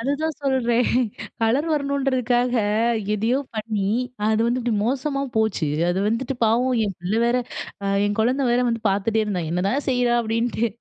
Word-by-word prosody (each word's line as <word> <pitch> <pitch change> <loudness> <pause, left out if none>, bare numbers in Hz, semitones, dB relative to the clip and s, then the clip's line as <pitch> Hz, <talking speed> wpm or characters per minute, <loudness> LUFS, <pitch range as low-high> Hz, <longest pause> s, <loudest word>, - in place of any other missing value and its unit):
அதுதான் 285 +5 -1
சொல்றேன், 245 -3 +2 0.5
கலர் 245 +8 +2
வரணுன்றதுக்காக, 260 -4 +1 0.6
எதயோ 225 +5 +1 0.2
பண்ணி 210 -2 -2 0.4
அது 220 0 +2
வந்து 240 +2 +1
இப்பிடி 240 -2 -1
மோசமா 275 +2 -1 0.2
போச்சு. 220 -7 +1 0.2
அது 175 +2 0
வந்துட்டு 245 +5 -1
பாவம் 245 +4 +2
என் 195 -3 -4
பிள்ள 180 +4 -2
வேற, 240 +1 +2 0.5
அ - - -1 0.2
என் 205 - -1
குழந்த 255 +5 +1
வேற 240 +1 +3
வந்து 230 -1 -1
பாத்துட்டே 210 +3 +1
இருந்தான், 185 -6 -2
என்னதான் 195 - -1
செய்றா? 245 -2 +2
அப்பிடின்ட்டு, 230 +1 0
235 Hz, 150 wpm, -23 LUFS, 220-260 Hz, 0.6 s, வேற